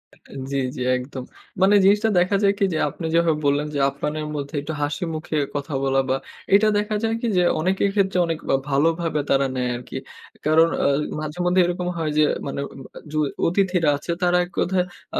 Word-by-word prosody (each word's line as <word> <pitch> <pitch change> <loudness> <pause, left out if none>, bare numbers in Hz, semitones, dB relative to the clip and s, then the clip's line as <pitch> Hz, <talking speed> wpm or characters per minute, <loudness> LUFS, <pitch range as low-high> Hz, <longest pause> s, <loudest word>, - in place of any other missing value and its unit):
আ - - -26 0.3
জি, 140 - 0 0.2
জি, - - -5 0.2
একদম। 130 +1 -7 0.4
মানে 195 +2 +5
জিনিসটা 205 +3 +4
দেখা 180 +3 +2
যায় 200 0 +4
কি 200 - +4
যে, - - 0
আপনি 165 - -7
যেভাবে 165 -2 +3
বললেন 145 +1 +2
যে, - - 0
আপ্যায়নের 150 +2 -4
মধ্যে 140 0 -5
একটু 150 +3 -5
হাসিমুখে 155 +1 -2 0.2
কথা 145 +1 -4
বলা 135 0 +2
বা 130 - +2 0.4
এটা 210 +2 +5
দেখা 210 +1 -1
যায় 225 0 +1
কি 240 - -1
যে 180 - +4 0.2
অনেকের 190 +4 +1
ক্ষেত্রে 190 -2 +1
অনেক 165 -1 -2 0.2
আ - - +6
ভালোভাবে 160 +3 +1
তারা 135 0 +3
নেয় 125 -1 -1
আরকি। 120 0 -7 0.5
কারণ 160 +2 +5 0.2
আ - - +5 0.3
মাঝেমধ্যে 180 +4 +1
এরকম 175 0 -2
হয় 160 -2 -1
যে 155 - +5 0.2
মানে 140 - -4 0.4
আ - - -7
য - - -12 0.3
অতিথিরা 180 -2 +2
আছে, 160 - -5
তারা 180 0 +3
এক 175 - -17
কথায় 180 0 +1 0.3
আ - - +2
165 Hz, 195 wpm, -22 LUFS, 145-185 Hz, 0.5 s, আ